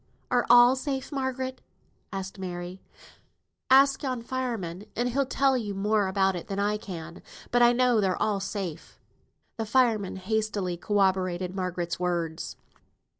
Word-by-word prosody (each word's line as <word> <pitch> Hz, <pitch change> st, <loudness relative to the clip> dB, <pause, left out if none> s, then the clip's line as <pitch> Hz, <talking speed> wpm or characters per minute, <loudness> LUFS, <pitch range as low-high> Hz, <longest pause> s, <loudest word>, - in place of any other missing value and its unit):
Are 245 Hz, -1 st, +2 dB
all 245 Hz, +1 st, +8 dB
safe, 270 Hz, +1 st, -3 dB
Margaret?" 260 Hz, -1 st, -3 dB, 0.5 s
asked 195 Hz, 0 st, -6 dB
Mary. 180 Hz, 0 st, -6 dB, 0.9 s
"Ask 270 Hz, +1 st, +6 dB
yon 255 Hz, -4 st, -3 dB
fireman, 225 Hz, -8 st, -4 dB
and 240 Hz, +2 st, 0 dB
he'll 270 Hz, +2 st, 0 dB
tell 270 Hz, 0 st, +2 dB
you 210 Hz, -5 st, -2 dB
more 205 Hz, +1 st, +1 dB
about 190 Hz, 0 st, +2 dB
it 175 Hz, -, -6 dB
than 195 Hz, -, -4 dB
I 205 Hz, +1 st, +1 dB
can. 170 Hz, -5 st, -8 dB, 0.3 s
But 245 Hz, -, +3 dB
I 240 Hz, 0 st, +7 dB
know 245 Hz, -2 st, +3 dB
they're 190 Hz, -2 st, 0 dB
all 205 Hz, -2 st, +1 dB
safe." 195 Hz, -5 st, -5 dB, 0.6 s
The 225 Hz, -, -2 dB
fireman 220 Hz, -5 st, +2 dB
hastily 200 Hz, -2 st, -1 dB
corroborated 185 Hz, -2 st, 0 dB
Margaret's 180 Hz, -2 st, -3 dB
words. 170 Hz, -3 st, -2 dB
205 Hz, 140 wpm, -27 LUFS, 185-245 Hz, 0.9 s, all